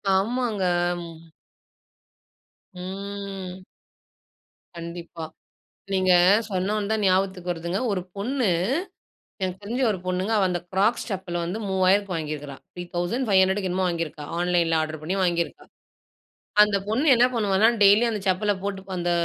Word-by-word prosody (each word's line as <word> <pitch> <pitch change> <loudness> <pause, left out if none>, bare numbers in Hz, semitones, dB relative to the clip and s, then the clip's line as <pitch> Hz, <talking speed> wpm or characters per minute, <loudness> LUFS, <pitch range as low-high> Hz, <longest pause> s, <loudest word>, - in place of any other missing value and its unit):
ஆமாங்க. 220 0 0 2.1
ம். 190 0 -6 1.1
கண்டிப்பா. 170 0 -7 0.7
நீங்க 185 -1 +3 0.4
சொன்ன 190 +2 0
உடனே 210 - -1
தான் 220 - 0
ஞாபகத்துக்கு 185 -1 +1
வருதுங்க. 170 +3 -3
ஒரு 185 - -1
பொண்ணு 245 +4 -1 1.0
எனக்கு 185 +1 -2
தெரிஞ்ச 240 +6 -2
ஒரு 190 - -2
பொண்ணுங்க. 185 +4 -1
அவ 195 - +3
அந்த 175 -1 -1
க்ராக்ஸ் 210 +5 +2
செப்பல் 190 -2 -3
வந்து 180 +6 -3
ரூ.3000க்கு 190 +1 +2
வாங்கியிருக்கா! 150 -3 -5 0.2
ரூ.3,500க்கு 190 +2 +1
என்னமோ 185 +1 0
வாங்கியிருக்கா! 165 -3 -3
ஆன்லைன்ல 175 -2 +2
ஆர்டர் 155 -1 -3
பண்ணி 170 +5 -2
வாங்கியிருக்கா! 170 -2 -1 1.0
அந்த 210 -1 +3
பொண்ணு 255 +8 +1
என்ன 240 0 +5
பண்ணுவான்னா, 210 -1 +3
டெய்லியும் 210 +4 +6
அந்த 210 - -3
செப்பல 205 +3 +2
போட்டு, 200 -1 -3 0.2
அந்த 175 0 -1
190 Hz, 120 wpm, -25 LUFS, 175-205 Hz, 2.1 s, டெய்லியும்